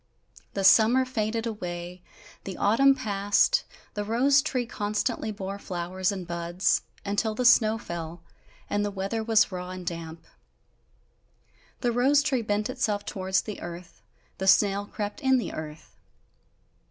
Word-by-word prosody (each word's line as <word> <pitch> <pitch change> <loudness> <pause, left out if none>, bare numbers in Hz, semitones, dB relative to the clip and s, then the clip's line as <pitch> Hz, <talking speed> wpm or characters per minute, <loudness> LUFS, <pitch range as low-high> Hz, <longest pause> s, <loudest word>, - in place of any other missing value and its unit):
The 195 - -1
summer 230 +6 +6
faded 225 -2 -2
away, 180 -4 -5 0.4
the 190 - -6
autumn 270 +7 +4
passed, 205 - +2 0.3
the 205 - -3
rose 260 +6 +3
tree 260 -4 -2
constantly 215 0 -2
bore 200 -1 -6
flowers 185 +1 -2
and 190 -3 -5
buds, 170 +1 0 0.2
until 205 +2 -1
the 250 - -1
snow 225 -3 +5
fell, 170 -4 -7 0.4
and 205 0 0
the 205 - -1
weather 200 +3 -3
was 220 -2 +3
raw 180 -1 -5
and 185 -1 -7
damp. 165 -1 -6 1.6
The 245 - +1
rose 270 +5 +3
tree 270 -5 0
bent 210 -1 -1
itself 220 -5 -1
towards 190 0 -1
the 210 - -7
earth, 170 -7 -9 0.4
the 190 - -2
snail 200 +1 +4
crept 210 +8 -5
in 265 -2 +4
the 245 - -3
earth. 155 0 -8
205 Hz, 140 wpm, -27 LUFS, 185-230 Hz, 1.6 s, summer